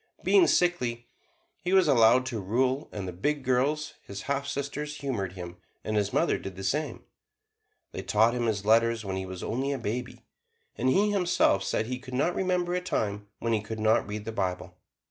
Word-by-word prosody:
Being 370 Hz, -4 st, +5 dB
sickly, 125 Hz, -10 st, +1 dB, 0.6 s
he 180 Hz, +1 st, -1 dB
was 190 Hz, -3 st, +5 dB
allowed 125 Hz, -1 st, +5 dB
to 120 Hz, -4 st, -3 dB
rule, 130 Hz, +8 st, 0 dB
and 100 Hz, -3 st, -5 dB
the 90 Hz, -, -5 dB
big 145 Hz, +10 st, -1 dB
girls, 135 Hz, +5 st, +1 dB
his 100 Hz, 0 st, -8 dB
half 140 Hz, 0 st, -2 dB
sisters, 140 Hz, +1 st, -4 dB
humored 115 Hz, -11 st, -3 dB
him, 90 Hz, -2 st, -8 dB, 0.3 s
and 110 Hz, -, -2 dB
his 105 Hz, -2 st, +1 dB
mother -, -, +1 dB
did 95 Hz, -1 st, -7 dB
the 95 Hz, -, -7 dB
same. 145 Hz, +4 st, -2 dB, 0.9 s
They -, -, -5 dB
taught 110 Hz, +2 st, +3 dB
him 120 Hz, -1 st, -1 dB
his 105 Hz, -3 st, -1 dB
letters 115 Hz, 0 st, +3 dB
when 95 Hz, -1 st, -3 dB
he 95 Hz, 0 st, -4 dB
was 95 Hz, -1 st, -7 dB
only 135 Hz, +4 st, -1 dB
a -, -, -2 dB
baby, 120 Hz, +1 st, -5 dB, 0.5 s
and 130 Hz, -, +1 dB
he 205 Hz, +9 st, +3 dB
himself 180 Hz, -, +2 dB
said 110 Hz, -, -1 dB
that -, -, -8 dB
he 125 Hz, 0 st, -3 dB
could 130 Hz, -1 st, -8 dB
not 155 Hz, +7 st, +1 dB
remember 180 Hz, -1 st, 0 dB
a 180 Hz, -, 0 dB
time 105 Hz, -, -2 dB
when 115 Hz, 0 st, -1 dB
he 110 Hz, -, +1 dB
could 110 Hz, +1 st, -6 dB
not 110 Hz, 0 st, +3 dB
read 105 Hz, 0 st, -5 dB
the 115 Hz, -, -3 dB
Bible. 90 Hz, -4 st, -3 dB
120 Hz, 205 wpm, -28 LUFS, 105-140 Hz, 0.9 s, Being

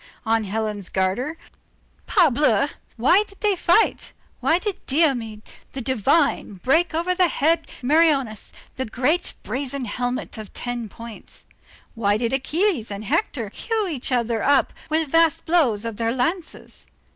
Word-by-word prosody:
On 225 Hz, -1 st, +1 dB
Helen's 210 Hz, -1 st, -2 dB
garter, 200 Hz, +12 st, -1 dB, 0.7 s
parbleu! 295 Hz, -, +3 dB, 0.3 s
Why 320 Hz, -, +4 dB
did 395 Hz, -, -16 dB
they 415 Hz, -2 st, +2 dB
fight, 350 Hz, +5 st, +2 dB, 0.3 s
why 325 Hz, -, +3 dB
did 390 Hz, 0 st, -4 dB
Diomed 250 Hz, -8 st, +1 dB, 0.3 s
the 270 Hz, -, -4 dB
divine 260 Hz, -1 st, +1 dB
break 315 Hz, -, +1 dB
over 345 Hz, +3 st, +1 dB
the 365 Hz, -1 st, +3 dB
head 320 Hz, +1 st, +1 dB
of -, -, -16 dB
Meriones 275 Hz, -6 st, +2 dB, 0.3 s
that 260 Hz, -4 st, -4 dB
great 290 Hz, +9 st, 0 dB
brazen 270 Hz, 0 st, -3 dB
helmet 245 Hz, 0 st, -3 dB
of 215 Hz, -, -9 dB
ten 240 Hz, -2 st, -4 dB
points? 230 Hz, +2 st, -10 dB, 0.5 s
why 205 Hz, -3 st, +1 dB
did 235 Hz, +2 st, -1 dB
Achilles 295 Hz, -, 0 dB
and 205 Hz, +1 st, -6 dB
Hector 280 Hz, -, -1 dB
hew 445 Hz, -3 st, -1 dB
each 280 Hz, -6 st, -3 dB
other 235 Hz, -2 st, 0 dB
up 280 Hz, -1 st, +3 dB, 0.2 s
with 315 Hz, 0 st, +1 dB
vast 330 Hz, 0 st, +3 dB
blows 265 Hz, -11 st, +2 dB
of 225 Hz, -3 st, -4 dB
their 230 Hz, 0 st, 0 dB
lances? 315 Hz, +8 st, -3 dB
265 Hz, 145 wpm, -23 LUFS, 230-330 Hz, 0.7 s, Why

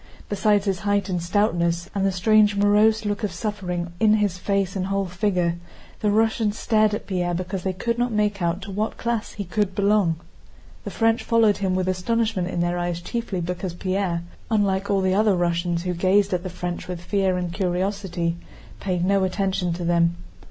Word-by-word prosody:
Besides 205 Hz, 0 st, +2 dB
his 195 Hz, -3 st, 0 dB
height 205 Hz, 0 st, 0 dB
and 180 Hz, -2 st, -1 dB
stoutness, 175 Hz, -2 st, +1 dB
and 195 Hz, -, -1 dB
the 195 Hz, -, +2 dB
strange 210 Hz, +2 st, +4 dB
morose 210 Hz, +2 st, +3 dB
look 205 Hz, +2 st, -2 dB
of 205 Hz, -, 0 dB
suffering 180 Hz, -3 st, -4 dB
in 215 Hz, -1 st, +5 dB
his 205 Hz, -4 st, 0 dB
face 195 Hz, -1 st, 0 dB
and 190 Hz, -1 st, -1 dB
whole 195 Hz, 0 st, 0 dB
figure, 180 Hz, -2 st, 0 dB, 0.4 s
the 210 Hz, -, +1 dB
Russians 220 Hz, 0 st, +1 dB
stared 215 Hz, -2 st, +2 dB
at -, -, -6 dB
Pierre 175 Hz, -2 st, -1 dB
because 185 Hz, +2 st, -3 dB
they 190 Hz, -, -1 dB
could 235 Hz, +5 st, -2 dB
not 245 Hz, 0 st, +1 dB
make 210 Hz, -2 st, 0 dB
out 175 Hz, +2 st, -1 dB
to 200 Hz, -, -7 dB
what 210 Hz, +3 st, -2 dB
class 235 Hz, -2 st, -2 dB
he 205 Hz, -, -4 dB
could 195 Hz, +1 st, -1 dB
belong. 200 Hz, -4 st, +3 dB, 0.7 s
The -, -, -3 dB
French 225 Hz, 0 st, +1 dB
followed 225 Hz, -3 st, +3 dB
him 190 Hz, -2 st, 0 dB
with 185 Hz, 0 st, 0 dB
astonishment 200 Hz, +1 st, 0 dB
in 175 Hz, -1 st, -2 dB
their 175 Hz, 0 st, 0 dB
eyes 175 Hz, -1 st, -2 dB
chiefly 200 Hz, 0 st, -3 dB
because 175 Hz, +1 st, -4 dB
Pierre, 185 Hz, -2 st, -1 dB, 0.3 s
unlike 200 Hz, -3 st, +1 dB
all 200 Hz, -1 st, +2 dB
the 190 Hz, 0 st, +2 dB
other 210 Hz, 0 st, +3 dB
Russians 170 Hz, 0 st, 0 dB
who 180 Hz, -1 st, -1 dB
gazed 195 Hz, +3 st, +2 dB
at 180 Hz, -, 0 dB
the 185 Hz, -, -5 dB
French 180 Hz, 0 st, -5 dB
with 180 Hz, -2 st, -5 dB
fear 190 Hz, -1 st, +1 dB
and 175 Hz, -1 st, -3 dB
curiosity, 180 Hz, -2 st, -1 dB, 0.4 s
paid 180 Hz, -2 st, -1 dB
no 195 Hz, 0 st, +3 dB
attention 190 Hz, -1 st, 0 dB
to 175 Hz, 0 st, -4 dB
them. 170 Hz, 0 st, +2 dB
190 Hz, 195 wpm, -23 LUFS, 175-210 Hz, 0.7 s, in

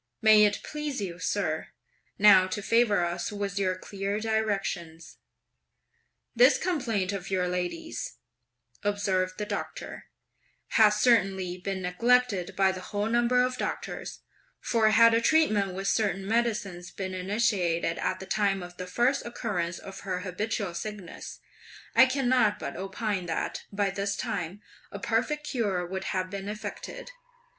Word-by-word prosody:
May 215 Hz, -1 st, +7 dB
it 205 Hz, 0 st, 0 dB
please 300 Hz, -3 st, -4 dB
you, 180 Hz, -4 st, -5 dB
sir, 180 Hz, -4 st, -1 dB, 0.5 s
now 195 Hz, -2 st, +7 dB
to 200 Hz, +2 st, -4 dB
favour 210 Hz, -5 st, +3 dB
us 175 Hz, +4 st, -3 dB
with 200 Hz, -1 st, -3 dB
your 185 Hz, -1 st, +1 dB
clear 200 Hz, +2 st, -3 dB
directions." 195 Hz, -7 st, -2 dB, 1.2 s
"This 255 Hz, +3 st, +6 dB
complaint 235 Hz, -, -1 dB
of 195 Hz, -1 st, -5 dB
your 185 Hz, -2 st, +1 dB
lady's," 180 Hz, -, -4 dB, 0.7 s
observed 190 Hz, -2 st, 0 dB
the 210 Hz, -, -3 dB
Doctor, -, -, -5 dB, 0.6 s
"has 215 Hz, -2 st, +5 dB
certainly 195 Hz, -5 st, +2 dB
been 190 Hz, 0 st, -4 dB
neglected 205 Hz, 0 st, +2 dB
by 195 Hz, -1 st, +4 dB
the 185 Hz, -1 st, -6 dB
whole 205 Hz, +2 st, -3 dB
number 240 Hz, +2 st, +3 dB
of 255 Hz, 0 st, -2 dB
doctors; -, -, -4 dB, 0.4 s
for 225 Hz, -2 st, +2 dB
had 230 Hz, +1 st, +6 dB
a 230 Hz, -, +3 dB
treatment 215 Hz, -, +3 dB
with 195 Hz, +1 st, -3 dB
certain 195 Hz, -3 st, +1 dB
medicines 210 Hz, -6 st, -1 dB
been 190 Hz, -1 st, -5 dB
initiated 185 Hz, -4 st, 0 dB
at -, -, -1 dB
the 190 Hz, -, -7 dB
time 195 Hz, -2 st, 0 dB
of 175 Hz, 0 st, -11 dB
the 180 Hz, -, -6 dB
first 245 Hz, +8 st, +1 dB
occurrence 190 Hz, -8 st, -3 dB
of 195 Hz, 0 st, -9 dB
her 185 Hz, -2 st, -3 dB
habitual 200 Hz, 0 st, -3 dB
sickness, 200 Hz, 0 st, -7 dB, 0.6 s
I 260 Hz, -, +8 dB
cannot 255 Hz, -5 st, +2 dB
but -, -, -6 dB
opine 195 Hz, -1 st, -3 dB
that, 160 Hz, -, -3 dB
by 200 Hz, -1 st, 0 dB
this 200 Hz, +1 st, -2 dB
time, 205 Hz, -4 st, -4 dB, 0.3 s
a -, -, -6 dB
perfect 235 Hz, +8 st, -1 dB
cure 200 Hz, -10 st, -1 dB
would 190 Hz, +2 st, -5 dB
have 185 Hz, -1 st, -2 dB
been 200 Hz, 0 st, -5 dB
effected. -, -, -7 dB
200 Hz, 145 wpm, -28 LUFS, 185-230 Hz, 1.2 s, I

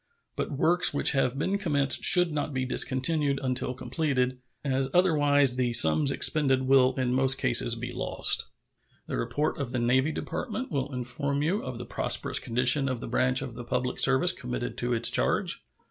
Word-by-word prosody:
But -, -, -4 dB
works 170 Hz, +3 st, +1 dB
which -, -, +2 dB
have 135 Hz, -2 st, -1 dB
been 195 Hz, +7 st, -2 dB
commenced 145 Hz, -8 st, +1 dB
should 180 Hz, -2 st, +6 dB
not 150 Hz, -1 st, -4 dB
be 130 Hz, 0 st, -2 dB
discontinued 140 Hz, +2 st, 0 dB
until 130 Hz, 0 st, -2 dB
completed, 130 Hz, -1 st, -2 dB, 0.3 s
as 135 Hz, -1 st, -1 dB
otherwise 145 Hz, -7 st, +3 dB
the 125 Hz, -2 st, -1 dB
sums 115 Hz, -, +4 dB
expended 135 Hz, -1 st, +1 dB
will 130 Hz, -1 st, +3 dB
in 125 Hz, -2 st, -2 dB
most 135 Hz, +1 st, +1 dB
cases -, -, +3 dB
be -, -, -7 dB
lost. -, -, 0 dB, 0.6 s
The -, -, -5 dB
report 145 Hz, -, -2 dB
from 140 Hz, -6 st, -4 dB
the 130 Hz, -, -4 dB
Navy 130 Hz, +5 st, +1 dB
Department 255 Hz, -, -6 dB
will 140 Hz, -1 st, -3 dB
inform 140 Hz, +3 st, -3 dB
you 185 Hz, +7 st, -1 dB
of 130 Hz, -2 st, -7 dB
the 120 Hz, -, -8 dB
prosperous -, -, -1 dB
condition 130 Hz, +4 st, +2 dB
of 130 Hz, -2 st, -4 dB
the -, -, -8 dB
branch 125 Hz, +2 st, +1 dB
of 130 Hz, -4 st, -8 dB
the 120 Hz, +1 st, -9 dB
public 125 Hz, +1 st, -3 dB
service 135 Hz, +7 st, +3 dB
committed 125 Hz, -4 st, -6 dB
to 120 Hz, 0 st, -3 dB
its 115 Hz, -1 st, +3 dB
charge. -, -, 0 dB
130 Hz, 175 wpm, -26 LUFS, 125-145 Hz, 0.6 s, should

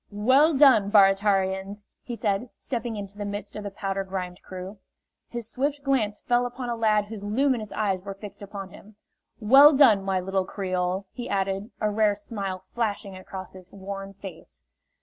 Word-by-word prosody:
"Well 260 Hz, +9 st, +4 dB
done, 260 Hz, -8 st, +6 dB
Baratarians!" 195 Hz, 0 st, +3 dB, 0.2 s
he 240 Hz, -, -6 dB
said, 215 Hz, +1 st, -1 dB
stepping 235 Hz, -3 st, -4 dB
into 200 Hz, 0 st, -7 dB
the -, -, -2 dB
midst 205 Hz, 0 st, -5 dB
of 210 Hz, -, -5 dB
the 200 Hz, -, -4 dB
powder 195 Hz, 0 st, -3 dB
grimed 185 Hz, -2 st, -5 dB
crew. 185 Hz, +2 st, -8 dB, 0.5 s
His 235 Hz, -2 st, -5 dB
swift 280 Hz, +4 st, -2 dB
glance 225 Hz, -7 st, 0 dB
fell 245 Hz, 0 st, +1 dB
upon 245 Hz, 0 st, -6 dB
a 235 Hz, -, -1 dB
lad 215 Hz, -2 st, +2 dB
whose 205 Hz, -1 st, -8 dB
luminous 230 Hz, +1 st, 0 dB
eyes 195 Hz, -4 st, -1 dB
were 195 Hz, +1 st, -7 dB
fixed 205 Hz, +1 st, -11 dB
upon 200 Hz, -1 st, -7 dB
him. 210 Hz, +3 st, -15 dB, 0.4 s
"Well 270 Hz, +7 st, +8 dB
done, 225 Hz, -9 st, +6 dB
my 195 Hz, -1 st, 0 dB
little 190 Hz, +1 st, -1 dB
creole!" 185 Hz, 0 st, -2 dB
he 245 Hz, -, -6 dB
added, 195 Hz, +2 st, -1 dB
a 215 Hz, -1 st, 0 dB
rare 210 Hz, -1 st, +2 dB
smile 200 Hz, -3 st, -5 dB
flashing 205 Hz, -4 st, -2 dB
across 185 Hz, 0 st, -9 dB
his 185 Hz, -1 st, -13 dB
worn 195 Hz, 0 st, -7 dB
face. 190 Hz, -4 st, -11 dB
205 Hz, 170 wpm, -26 LUFS, 195-225 Hz, 0.5 s, Well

